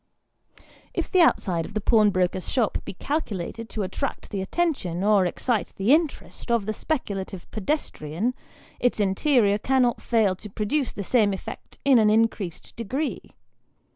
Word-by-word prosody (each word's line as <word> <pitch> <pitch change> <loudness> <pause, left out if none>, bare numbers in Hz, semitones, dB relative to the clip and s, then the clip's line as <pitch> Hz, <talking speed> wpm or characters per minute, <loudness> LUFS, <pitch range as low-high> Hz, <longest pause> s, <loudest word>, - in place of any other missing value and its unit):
If - - -2
the 370 - +5
outside 180 - +3
of 205 - -10
the - - +1
pawnbroker's 195 -4 +2
shop 235 -5 +1
be - - -7
calculated 230 - -3
to 215 - -3
attract 220 +9 -4
the 200 -3 -2
attention, 190 - -1
or 205 -3 +4
excite 225 +5 -1
the 205 +8 +3
interest, 310 -5 -1
of 235 -4 +2
the 215 - -1
speculative 200 - -3
pedestrian, 215 - -2 0.5
its 245 -2 +1
interior 205 +1 +3
cannot 255 0 +2
fail 220 -5 +2
to 210 - -9
produce 220 +7 -1
the 200 - -5
same 210 -1 +3
effect 190 - -8
in 270 -4 +6
an 215 -1 +4
increased 215 -5 0
degree. 260 +7 -3
215 Hz, 145 wpm, -25 LUFS, 195-255 Hz, 0.5 s, in